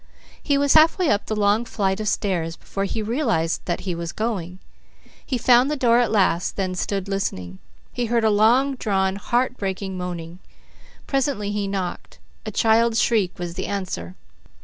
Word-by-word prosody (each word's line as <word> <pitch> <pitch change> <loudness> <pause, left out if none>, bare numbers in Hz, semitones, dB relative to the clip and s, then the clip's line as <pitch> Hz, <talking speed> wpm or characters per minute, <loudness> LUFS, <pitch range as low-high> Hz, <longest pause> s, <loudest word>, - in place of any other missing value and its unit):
He 285 -2 +1
was 285 0 +3
halfway 320 +2 +5
up 205 - 0
the 215 - -2
long 210 +2 +2
flight 195 -4 -1
of 215 - -3
stairs 175 -6 -1
before 195 +2 -4
he 220 +2 -3
realized 220 - 0
that 175 - -2
he 185 -2 -3
was 170 0 -5
going. 190 -6 -3 0.7
He 255 - -2
found 245 +2 +4
the 300 - 0
door 240 -4 +3
at 245 - +2
last, 185 -5 +1
then, 190 -2 -2
stood 195 +1 -2
listening. 95 - -3 0.3
He 245 -2 -1
heard 230 0 +1
long 225 +6 +4
drawn, 190 -3 0
heart 250 +4 0
breaking 190 -1 -4
moaning. 175 -1 -6 0.7
Presently 270 -7 -1
he 205 -1 -2
knocked. 190 -2 -4 0.3
A - - -3
child's 225 +2 +3
shriek 210 -6 +1
was 175 -1 -5
the 190 +2 -4
answer. 135 - -4
205 Hz, 170 wpm, -22 LUFS, 185-235 Hz, 0.7 s, halfway